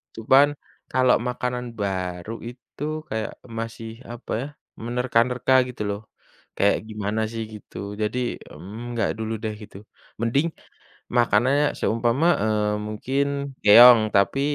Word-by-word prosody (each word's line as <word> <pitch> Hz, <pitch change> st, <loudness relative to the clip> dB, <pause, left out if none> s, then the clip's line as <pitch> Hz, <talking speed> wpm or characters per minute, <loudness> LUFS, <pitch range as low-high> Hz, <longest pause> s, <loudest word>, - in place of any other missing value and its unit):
Cuman 135 Hz, +6 st, +5 dB, 0.4 s
kalau 130 Hz, -1 st, +4 dB
makanan 125 Hz, 0 st, -3 dB
baru 95 Hz, 0 st, -3 dB, 0.2 s
itu 125 Hz, +3 st, -11 dB, 0.3 s
kayak 110 Hz, -1 st, -3 dB, 0.3 s
masih 115 Hz, 0 st, -6 dB, 0.2 s
apa 120 Hz, +1 st, -9 dB
ya, -, -, -4 dB, 0.4 s
menerka-nerka 125 Hz, +1 st, +1 dB, 0.2 s
gitu 125 Hz, -, -8 dB
loh, 100 Hz, -, -3 dB, 0.6 s
kayak 100 Hz, -, +3 dB
gimana 105 Hz, 0 st, -2 dB
sih 115 Hz, -1 st, -4 dB
gitu, 105 Hz, -, -12 dB, 0.2 s
jadi, 105 Hz, +3 st, -1 dB, 0.3 s
mmm, 90 Hz, +7 st, -10 dB, 0.2 s
nggak 115 Hz, -4 st, 0 dB
dulu 110 Hz, 0 st, -3 dB
deh 110 Hz, -1 st, -2 dB
gitu. 105 Hz, -2 st, -12 dB, 0.4 s
Mending 120 Hz, +8 st, +1 dB, 0.7 s
makanannya 120 Hz, +5 st, +3 dB
seumpama, 120 Hz, +7 st, +1 dB, 0.2 s
eee, 105 Hz, -1 st, +1 dB, 0.2 s
mungkin 130 Hz, +6 st, -1 dB, 0.4 s
keong, 120 Hz, +3 st, +9 dB
tapi, 100 Hz, +7 st, +3 dB
115 Hz, 120 wpm, -24 LUFS, 105-125 Hz, 0.7 s, keong